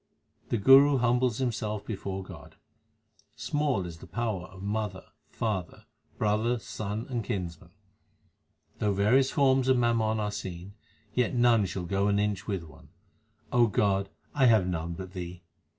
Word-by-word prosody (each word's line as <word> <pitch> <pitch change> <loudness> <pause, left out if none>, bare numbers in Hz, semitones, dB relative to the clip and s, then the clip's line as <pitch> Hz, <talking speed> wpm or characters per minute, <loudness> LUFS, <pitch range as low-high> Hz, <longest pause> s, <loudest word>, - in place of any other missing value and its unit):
The 120 - +1
Guru 135 +6 +7
humbles 125 -1 +2
himself 110 -5 -2
before 95 -2 -4
God: 85 -7 -12 0.8
Small 145 -10 -1
is 85 -2 -8
the - - -12
power 95 -1 -3
of 95 +2 -12
mother, 105 -2 -3 0.2
father, 100 -6 -3 0.3
brother, 110 +3 +1
son, 110 -1 -5
and 120 -4 -3
kinsman. 85 -5 -5 1.1
Though 105 -1 +1
various 125 +7 +3
forms 135 -2 +3
of 130 -1 +4
mammon 115 -2 +1
are 105 -1 -1
seen, 95 -2 -7 0.4
yet 125 +1 +1
none 120 -4 +4
shall 90 +1 -4
go 100 +3 0
an 100 0 +2
inch 105 -3 -1
with 95 -5 -2
one. 75 -4 -16 0.6
God, 100 -4 +2 0.2
I 135 -3 +4
have 110 -5 +5
none 85 -2 -3
but 95 +1 -8
Thee. 90 -1 -7
105 Hz, 145 wpm, -28 LUFS, 95-120 Hz, 1.1 s, Guru